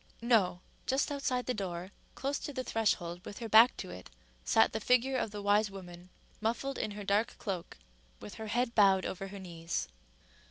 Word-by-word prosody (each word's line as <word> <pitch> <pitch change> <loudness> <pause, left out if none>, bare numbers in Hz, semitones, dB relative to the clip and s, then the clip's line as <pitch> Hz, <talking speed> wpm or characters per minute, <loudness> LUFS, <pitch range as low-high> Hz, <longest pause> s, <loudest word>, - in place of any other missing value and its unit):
—No: 220 -7 +2 0.3
just 270 +3 +1
outside 260 -3 -1
the 250 - 0
door, 185 -3 -4 0.2
close 275 +1 -2
to - - -5
the 260 -2 -3
threshold, 180 -7 0
with 205 - -8
her 230 - -5
back 225 +3 +7
to - - -6
it, 90 +1 -10 0.3
sat - - +4
the - - -1
figure 250 +2 +3
of 245 - 0
the 205 -1 -7
wise 205 +1 +3
woman, 180 -2 -10 0.3
muffled 240 +5 -1
in - - -1
her 205 - -5
dark 200 +3 +1
cloak, 185 - -5 0.4
with 105 - -9
her 220 - -4
head 240 +2 0
bowed 195 -4 +5
over 195 +1 -4
her 200 +1 -8
knees. 165 - -4
205 Hz, 190 wpm, -32 LUFS, 185-245 Hz, 0.4 s, back